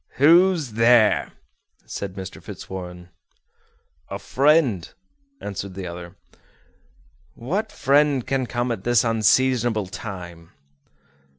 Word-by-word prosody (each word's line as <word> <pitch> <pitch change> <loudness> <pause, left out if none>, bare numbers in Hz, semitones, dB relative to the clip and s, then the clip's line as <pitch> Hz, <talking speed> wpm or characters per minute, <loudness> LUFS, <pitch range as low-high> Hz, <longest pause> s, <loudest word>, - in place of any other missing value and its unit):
"Who's 165 -1 +4
there?" 115 0 +4 0.5
said 100 -2 -6
Mr. 95 -1 -8
Fitzwarren. 90 -2 -9 1.0
"A - - -4
friend," 135 - +2 0.5
answered 100 -2 -6
the 95 -1 -6
other. 85 +1 -8 1.2
"What 190 - -3
friend 140 -2 +2
can 135 -2 -1
come 120 0 -2
at 110 -5 -4
this 120 -1 +3
unseasonable 115 0 +2
time?" 90 -3 -9
115 Hz, 95 wpm, -23 LUFS, 95-130 Hz, 1.2 s, Who's